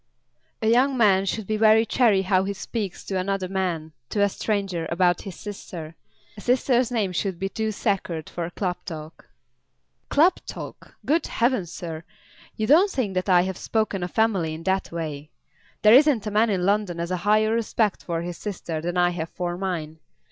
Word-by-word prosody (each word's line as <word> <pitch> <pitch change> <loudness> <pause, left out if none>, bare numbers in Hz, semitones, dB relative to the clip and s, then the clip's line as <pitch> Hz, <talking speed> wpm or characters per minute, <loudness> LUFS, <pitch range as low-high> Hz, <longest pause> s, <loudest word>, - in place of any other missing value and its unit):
"A - - +2
young 255 +4 +3
man 195 -4 +4
should 215 +2 -2
be 215 +2 -1
very 220 +1 +5
chary 220 -6 +3
how 185 0 +2
he 200 +1 -2
speaks 200 -1 -5
to 190 -1 -2
another 190 0 -1
man, 180 -4 -2 0.2
to 205 - +1
a 205 - +3
stranger, 195 -5 -2
about 175 0 +2
his 190 -4 -8
sister. 175 -6 -8 0.4
A 205 - -10
sister's 250 0 +2
name 220 -6 0
should 185 0 -2
be 195 +2 -2
too 220 +2 -2
sacred 185 -6 -2
for 170 -1 -4
club 180 0 -2
talk." 155 -2 -9 0.8
"Club 330 +6 +4
talk! - - -9
Good 320 +4 +1
heavens, 230 -8 0
sir; 165 -2 -6 0.5
you 215 - -1
don't 335 - +5
think 245 - -2
that 185 +1 -1
I 180 -1 +6
have 190 0 -3
spoken 215 -4 -1
of 180 0 -5
Emily 195 -8 +2
in 165 - -9
that 190 +1 0
way? 155 -3 -5 0.5
There 215 +1 +8
isn't 265 -5 +5
a 210 - -3
man 220 +2 +3
in 185 -3 0
London 200 -3 +1
has 170 +1 -3
a 185 - 0
higher 215 +4 +2
respect 225 -2 0
for 170 -1 -3
his 175 -1 -5
sister 175 -6 -4
than 175 +2 -3
I 175 0 +4
have 165 -2 -4
for 175 -1 -3
mine. 170 -4 -4
195 Hz, 190 wpm, -24 LUFS, 175-220 Hz, 0.8 s, There